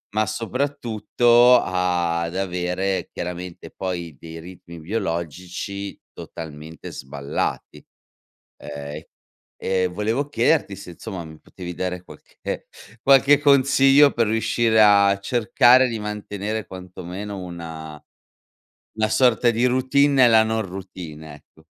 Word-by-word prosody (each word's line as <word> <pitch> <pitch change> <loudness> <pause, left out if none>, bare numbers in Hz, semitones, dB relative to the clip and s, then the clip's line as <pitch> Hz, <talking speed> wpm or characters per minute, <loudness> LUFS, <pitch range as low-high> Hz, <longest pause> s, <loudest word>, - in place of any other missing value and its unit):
ma 110 - +2
soprattutto 120 0 +2
ad 85 -2 -1
avere 95 0 -2
chiaramente 90 0 -6
poi 85 -6 -5
dei 80 0 -9
ritmi 85 -1 -12
biologici 90 +1 -5
totalmente 80 0 -9
sballati. 70 +1 -5 0.8
Ehm, 75 +1 -7 0.6
e 95 -1 +1
volevo 110 +10 -2
chiederti 120 -4 +1
se 95 -3 -10
insomma 90 -1 -7
mi 80 -1 -12
potevi 90 -2 -9
dare 90 0 -3
qualche - - -17 0.7
qualche 140 +1 +6
consiglio 140 0 +5
per 115 -2 +1
riuscire 110 0 +2
a 100 -1 +5
cercare 120 +4 +4
di 115 -2 -4
mantenere 105 0 -4
quanto 90 0 -10
meno 100 +3 -6
una 80 -3 -8 1.0
una 110 -1 +1
sorta 120 -1 +3
di 120 +2 +1
routine 130 +3 +3
e 130 -2 +6
nella 110 -1 +6
non 110 0 -1
routine, 85 -5 -9
ecco. 80 +2 -22
95 Hz, 115 wpm, -22 LUFS, 85-115 Hz, 1.0 s, qualche